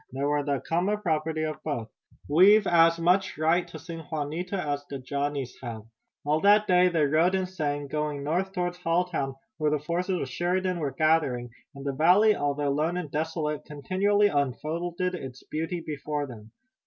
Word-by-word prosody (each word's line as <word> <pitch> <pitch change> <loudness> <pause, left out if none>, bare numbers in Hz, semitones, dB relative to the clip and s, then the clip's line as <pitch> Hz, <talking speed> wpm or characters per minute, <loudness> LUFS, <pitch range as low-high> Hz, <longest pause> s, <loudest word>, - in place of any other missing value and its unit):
They 135 +2 -4
were 145 +1 +1
the 140 -1 -1
common 185 +6 0
property 160 -4 -1
of 155 -1 -4
both. 120 -8 -3 0.4
We've 195 +8 +6
as 165 -1 +5
much 180 +3 +2
right 165 +3 +2
to 170 - -9
sing 165 +2 -8
Juanita 160 +5 -3
as 145 -5 -2
the 140 - -4
Johnnies 140 0 -3
have." 115 -4 -6 0.4
All 150 +2 +1
that 210 +1 +5
day 180 -1 +5
they 165 -4 +2
rode 160 +6 +3
and 190 -1 0
sang, 145 -6 -3
going 150 -1 -2
north 180 +6 -1
toward 180 -2 -2
Halltown, 165 -5 -1 0.2
where 155 -1 +2
the 150 - +1
forces 175 +5 -2
of - - -3
Sheridan 180 +5 -1
were 145 -3 -1
gathering, 135 -4 +1 0.2
and 140 0 -9
the 140 - -1
valley, 185 +9 +5
although 145 0 0
lone 155 +5 0
and 165 -5 -5
desolate, 155 0 -2
continually 190 +8 +1
unfolded 165 +5 -2
its 130 -7 -7
beauty 165 +3 -3
before 150 0 -3
them. 110 -5 -11
155 Hz, 175 wpm, -27 LUFS, 145-180 Hz, 0.4 s, We've